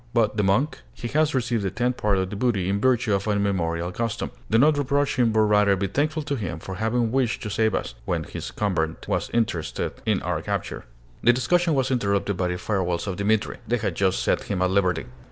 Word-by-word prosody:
"But 110 -2 +2
the 105 - +2
monk?" 105 +10 +1 0.2
"He 120 - -5
has 155 +1 +2
received 120 -4 0
a 95 - 0
tenth 120 +6 -1
part 105 -2 +1
of 95 0 -1
the - - -4
booty 100 -5 0
in 100 +1 0
virtue 120 -4 +2
of 100 +1 0
an 105 -1 +2
immemorial 85 -4 -1
custom. 115 +2 -3 0.2
Do 115 - +4
not 145 +4 +4
reproach 145 +1 +1
him, 120 -3 +3
but 110 0 +3
rather 105 -2 +4
be 100 +1 -1
thankful 150 - -1
to 145 -1 -2
him 95 -9 -4
for 95 +4 -7
having 110 +4 0
wished 125 -3 0
to 105 - -4
save 110 +1 +1
us, - - -3
when - - -1
his - - -6
convent 90 -6 -2
was - - -1
interested 110 -9 -1
in - - +3
our - - -1
capture." - - -4 0.4
This 120 +1 +5
discussion 165 +6 +2
was 130 -1 +1
interrupted 100 -4 0
by 90 0 0
the 90 0 -2
farewells 90 -2 -1
of 95 -3 -3
Dimitri. 105 +1 0
They 120 - +1
had 110 - -2
just 95 -2 +1
set - - +1
him 95 -2 -1
at 90 - +1
liberty. 90 -6 +1
105 Hz, 225 wpm, -24 LUFS, 95-120 Hz, 0.4 s, This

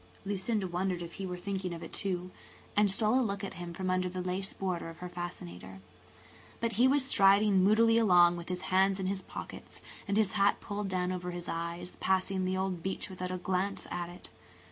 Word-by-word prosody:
Lucinda 200 +1 -1
wondered 180 0 -1
if 170 - -8
he 190 - -2
were 180 -1 -4
thinking 190 -1 -3
of 170 - -8
it, 165 - -9
too, 185 -2 -2 0.4
and 210 -1 +5
stole 215 +5 +3
a - - +3
look 200 -3 -2
at 195 - -4
him 175 -1 -5
from 185 +2 -2
under 185 0 +1
the 185 +1 -5
lace 185 +2 -1
border 180 -3 -3
of 165 - -10
her 180 - -6
fascinator. 95 - -7 0.8
But 230 0 0
he 235 +4 +4
was 275 0 +4
striding 200 -4 +5
moodily 225 +3 +5
along 175 -5 +6
with 170 0 -7
his 180 -1 -2
hands 190 +1 +4
in 190 - -2
his 190 0 -1
pockets, - - -9 0.3
and 200 +1 +1
his 215 -3 +3
hat 200 0 +3
pulled 205 0 -4
down 180 -1 0
over 180 -1 -3
his 175 0 -5
eyes, 170 +1 -4
passing 190 0 +1
the 185 0 0
old 190 -2 -1
beech 190 +1 -4
without 185 0 -4
a 185 - -2
glance 190 +2 -1
at 175 -1 -3
it. 175 - -12
185 Hz, 210 wpm, -31 LUFS, 180-200 Hz, 0.8 s, along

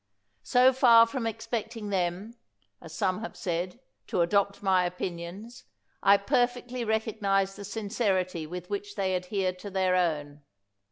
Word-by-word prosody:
So 250 - +4
far 235 -3 +7
from 230 0 -3
expecting 225 -1 -4
them, 185 +4 -1 0.5
as 165 - -11
some 185 +3 -1
have 225 - -7
said, 180 +4 -3 0.3
to 180 - 0
adopt 200 +3 +1
my 190 -2 +3
opinions, 180 +5 -6 0.4
I 200 +1 +6
per 245 +4 +2
fectly 245 0 -7
recognize 205 -3 0
the 205 - -8
sincerity 195 -5 -1
with 180 +2 -7
which 205 +1 -5
they 190 -2 0
adhere 185 +1 -1
to 185 +3 -9
their 190 -1 +1
own. 150 -5 -1
200 Hz, 145 wpm, -28 LUFS, 180-225 Hz, 0.5 s, far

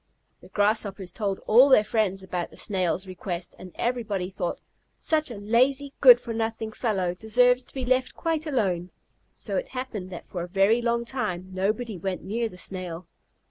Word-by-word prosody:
The - - -15
Grasshoppers 205 -3 0
told 200 -1 -2
all 250 +6 +7
their 260 -5 +7
friends 200 -4 0
about 180 -2 -3
the - - -13
Snail's 185 -2 0
request, 180 -1 -5
and 185 - -10
everybody 215 -7 -2
thought, 175 -2 -3 0.4
"Such 310 -2 +1
a 240 - -6
lazy, 260 +7 +1
good 250 -3 +9
for 235 -1 -6
nothing 225 0 -2
fellow 195 -6 -1
deserves 245 +6 +3
to - - -15
be 260 -2 -3
left 255 +1 +1
quite 325 -1 -1
alone." 190 - 0 0.5
So - - -3
it - - -2
happened 250 -8 -5
that 175 - -9
for 180 - -5
a 175 - -4
very 195 +5 +3
long 235 0 0
time 185 -8 -3
nobody 210 +2 -1
went 185 +1 -3
near 230 +3 -2
the 180 - -13
Snail. 180 -2 -5
215 Hz, 180 wpm, -26 LUFS, 185-245 Hz, 0.5 s, good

